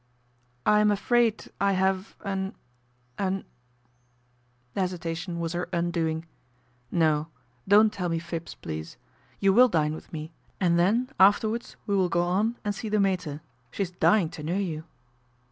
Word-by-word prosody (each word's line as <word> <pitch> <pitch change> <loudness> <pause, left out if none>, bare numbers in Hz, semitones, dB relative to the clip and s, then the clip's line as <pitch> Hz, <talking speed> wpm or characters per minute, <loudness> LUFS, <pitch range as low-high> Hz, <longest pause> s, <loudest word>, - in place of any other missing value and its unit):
" 125 0 -40
I 210 - +5
am 210 0 +4
afraid 225 +2 +1
I 200 0 +3
have 190 +2 0
an 195 -1 -2 0.6
an 195 0 -1 0.6
" 125 0 -40
The 195 - -1
hesitation 175 -1 -3
was 165 0 -2
her 175 +1 -3
undoing. 170 -2 -1 0.4
" 125 0 -38
No; 155 -3 +2 0.4
don't 210 +2 +6
tell 180 -3 -2
me 165 - 0
fibs, 170 0 -5
please. 80 +3 -7 0.4
You 195 -1 +4
will 250 +4 +7
dine 155 -5 +1
with 155 - -10
me 155 0 -6 0.3
and 170 -2 +3
then, 225 +8 +2
afterwards, 215 +4 +3
we 200 - 0
will 185 -2 +2
go 175 +1 +2
on 200 +7 +1
and 205 - 0
see 220 - -5
the 210 0 +2
mater. 180 -7 0 0.3
She 200 - -2
is 180 - -5
dying 180 -1 +3
to 160 - -9
know 165 +5 -1
you." 160 -6 -3
175 Hz, 165 wpm, -27 LUFS, 160-200 Hz, 0.6 s, will